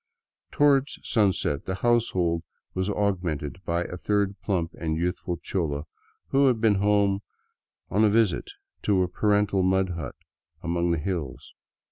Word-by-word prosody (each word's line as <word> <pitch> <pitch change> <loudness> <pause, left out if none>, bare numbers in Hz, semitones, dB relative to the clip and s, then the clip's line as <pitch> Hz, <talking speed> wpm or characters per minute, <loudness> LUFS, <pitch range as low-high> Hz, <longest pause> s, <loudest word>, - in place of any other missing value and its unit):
Toward 140 -1 +3
sunset 95 - +1
the 95 - -2
household 95 -7 +1 0.3
was 95 +2 -1
augmented 90 -5 -2
by 85 +1 0
a 90 - -6
third 100 +1 0
plump 85 -5 -1
and 80 -1 -1
youthful 90 0 -2
chola 75 -7 -2 0.5
who 135 0 +4
had 125 -4 +2
been 110 -3 +3
home 100 -1 +3 0.7
on 105 +3 +3
a 110 - +6
visit 110 -3 +2 0.3
to 100 -3 +2
her 90 - +2
parental 100 +1 +2
mud 95 0 +2
hut 85 -7 -5 0.5
among 85 0 0
the 85 - +2
hills. 75 -5 -4
95 Hz, 140 wpm, -26 LUFS, 85-105 Hz, 0.7 s, a